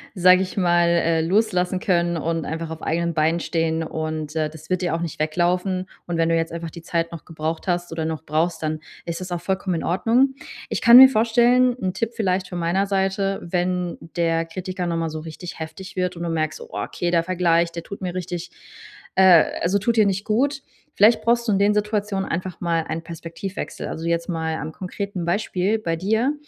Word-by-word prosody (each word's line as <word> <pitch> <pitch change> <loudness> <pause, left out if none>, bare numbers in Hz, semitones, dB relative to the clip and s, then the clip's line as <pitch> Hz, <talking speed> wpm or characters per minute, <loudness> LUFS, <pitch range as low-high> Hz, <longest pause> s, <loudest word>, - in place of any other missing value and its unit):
sage 185 0 +6
ich 190 +1 -4
mal, 175 -2 +3
äh, 165 -1 +2
loslassen 185 0 +1
können 175 -2 +1
und 165 +1 -2
einfach 160 0 -4
auf 160 - -7
eigenen 170 +1 -1
Beinen 160 +2 +2
stehen 165 -1 -1
und, 155 -1 -4
äh, 155 -1 0
das 160 0 -13
wird 185 0 +1
dir 175 -2 0
auch 165 - -3
nicht 170 -3 -5
weglaufen. 180 +4 0 0.2
Und 175 -1 -2
wenn 165 0 +2
du 165 - +3
jetzt 165 0 -1
einfach 165 -1 -5
die 170 - -10
Zeit 165 0 -2
noch 165 -2 -8
gebraucht 160 +2 -4
hast 175 -1 -1
oder 165 -1 -3
noch 160 -1 -3
brauchst, 160 +2 0
dann 155 0 -1 0.3
ist 170 +1 -4
das 185 -1 -6
auch 175 - -2
vollkommen 190 0 -1
in - - -4
Ordnung. 235 +9 +2 0.4
Ich - - -2
kann 235 +1 +9
mir 265 +1 +12
vorstellen 245 +1 +3
'n 185 -1 -2
Tipp 230 -1 -2
vielleicht 190 -4 0
von 180 - -5
meiner 175 +4 0
Seite, 195 0 0
wenn 180 0 -1 0.2
der 165 -1 +1
Kritiker 180 +1 -4
nochmal 165 -1 -1
so 155 - -5
richtig 165 +3 -8
heftig 185 +4 -8
wird 180 -1 -1
und 170 - -6
du 170 - -2
merkst, 155 -1 -1
Oh, 470 - -15
okay, 175 -1 -3
der 170 -1 +3
Vergleich, 170 -1 +2
der 170 0 -6
tut 200 - -9
mir 180 -1 -4
richtig 180 -1 -4 0.7
äh, 185 -4 +7 0.2
also 180 +4 +2
tut 225 +4 0
dir 215 -2 +5
nicht 195 +1 -1
gut. 275 +6 +1 0.3
Vielleicht 220 +2 +5
brauchst 235 +1 +2
du - - +2
in 195 - +2
den 205 +1 +4
Situationen 210 -2 -1
einfach 180 +1 -4
mal 170 -2 +1
einen 165 - -4
Perspektivwechsel. 170 +4 -6
Also, 165 - -5
jetzt 170 0 0
mal 160 -2 -2
an 155 0 -5
konkreten 190 +1 -5
Beispiel 195 +2 0
bei 165 -6 -1
dir. 220 - +1
175 Hz, 210 wpm, -22 LUFS, 165-195 Hz, 0.7 s, mir